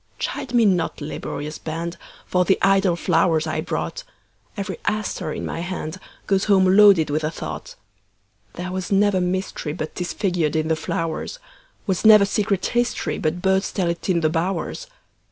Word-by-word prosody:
Chide 240 - -4
me 235 -2 +5
not, 180 -5 +1
laborious 150 0 -5
band, 165 +2 -4 0.3
For 180 0 +2
the 190 +1 +3
idle 195 -2 +4
flowers 165 -1 +2
I 155 0 -2
brought; - - -4 0.5
Every 200 - -4
aster 215 -7 -2
in - - -4
my 165 - -4
handGoes 185 +2 -3
home 190 -2 +4
loaded 195 -8 +6
with 155 +1 0
a 155 - +1
thought. 165 - -7 0.8
There 180 +1 -5
was 185 0 -4
never 200 -1 +3
mysteryBut 180 -4 -3
'tis 180 -1 -3
figured 175 -7 0
in 160 0 0
the 160 - +3
flowers; 165 - -3 0.5
SWas 190 -2 0
never 215 -2 +8
secret 200 -2 0
historyBut 180 -8 -1
birds 190 +1 +2
tell 180 -4 0
it 170 - -6
in 170 -2 +2
the 155 - +2
bowers. 185 - -2
180 Hz, 155 wpm, -22 LUFS, 160-195 Hz, 0.8 s, never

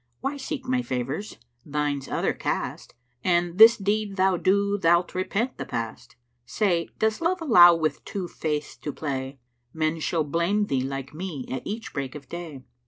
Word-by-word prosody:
Why 275 +2 -2
seek 275 -1 -5
my 255 0 +1
favours? 135 - -4 0.3
Thine's 145 -2 -2
other - - 0
caste; - - -4 0.3
An 175 -1 +1
this 225 +2 +9
deed 205 0 -1
thou 190 -1 +3
do 200 +3 +2
thou'lt 170 0 +3
repent 205 +7 -2
the - - -3
past. 115 +1 -5 0.3
Say, 170 - 0
does 220 +4 0
Love 355 +3 +1
allow 175 - +8
with 160 -2 -1
two 190 -3 -4
Faiths 150 -3 -3
to 150 - -5
play? 135 -2 -4 0.4
Men 160 0 0
shall 160 0 0
blame 170 +8 +1
thee 135 -8 0
like 135 +1 -5
me, 160 -5 -5
at 130 -1 -3
each 225 +2 -5
break 135 -1 -4
of 140 -2 -9
day! 165 -6 -7
170 Hz, 170 wpm, -25 LUFS, 145-205 Hz, 0.4 s, this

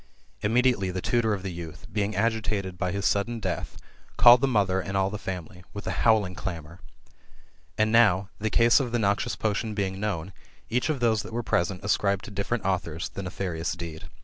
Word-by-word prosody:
Immediately 115 -2 +2
the 95 0 -3
tutor 110 +1 +1
of 95 - -8
the 95 - -3
youth, 85 -2 -8
being 105 0 -1
agitated 105 -3 -1
by 90 0 -2
his 100 -1 -3
sudden 115 +3 +1
death, - - -4 0.4
called 120 +1 +8
the 135 - +3
mother 100 -6 +2
and 100 +1 -3
all 95 0 +1
the 105 - -5
family, 90 -2 -6
with 100 - -6
a - - -1
howling 110 -5 +3
clamour. 85 -2 -6 1.0
And 110 0 +2
now, 100 -5 +4
the 110 +1 -1
case 115 +4 +5
of 125 -4 -2
the - - +3
noxious 100 -2 0
potion 110 0 -2
being 95 -2 -2
known, 95 -4 -3 0.4
each 125 +6 +1
of 145 -5 -1
those 110 -3 +3
that 110 +3 -10
were 120 +1 -2
present 90 -1 0
ascribed 100 -1 +1
to - - -9
difier 100 +3 -2
ent 115 -6 -2
authors 90 -4 -2
the - - -6
nefarious 90 -3 -3
deed. 85 -2 -7
100 Hz, 200 wpm, -26 LUFS, 95-110 Hz, 1.0 s, called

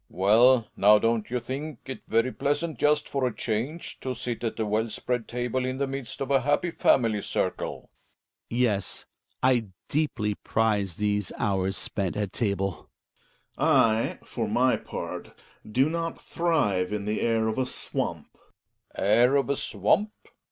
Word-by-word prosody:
Well, 115 +6 +4
now, 105 +2 +6
don't 115 0 0
you 125 +1 -1
think 135 +5 -6
it 130 - -6
very 115 +3 +2
pleasant, 155 +5 -1
just 150 0 +2
for 135 -2 0
a 120 - -4
change, 120 +10 -3
to 130 -1 -4
sit 120 0 -4
at 115 - -3
a 110 - +1
well 110 +2 0
spread 120 +1 -3
table 125 +1 -2
in 130 +1 -2
the 140 - 0
midst 135 -1 -6
of 135 0 -2
a 135 -1 +4
happy 145 +6 +1
family 115 -9 +2
circle? - - -3 0.6
Hjalmar. 120 - -2
Yes, 105 -5 -1 0.4
I 125 -4 +3 0.2
deeply 120 -9 0
prize 100 -4 0
these 105 -2 0
hours 95 -1 0
spent 95 -2 -2
at 105 -3 -2
table. 100 -5 -2 0.7
Gregers. - - -35
I, 110 0 +3
for - - -3
m - - -2
y - - +4
part, - - -7 0.4
do 130 +6 +3
not 165 +1 -3
thrive 130 - 0
in 105 -1 -3
the 105 +1 -1
air 115 -1 +2
of 110 +3 -1
a 130 - +1
swamp. - - -2
J - - -32
Relling. - - -10
Air 120 +6 +5
of 135 -3 +2
a - - +1
swamp 130 - +1
115 Hz, 170 wpm, -27 LUFS, 105-135 Hz, 0.7 s, now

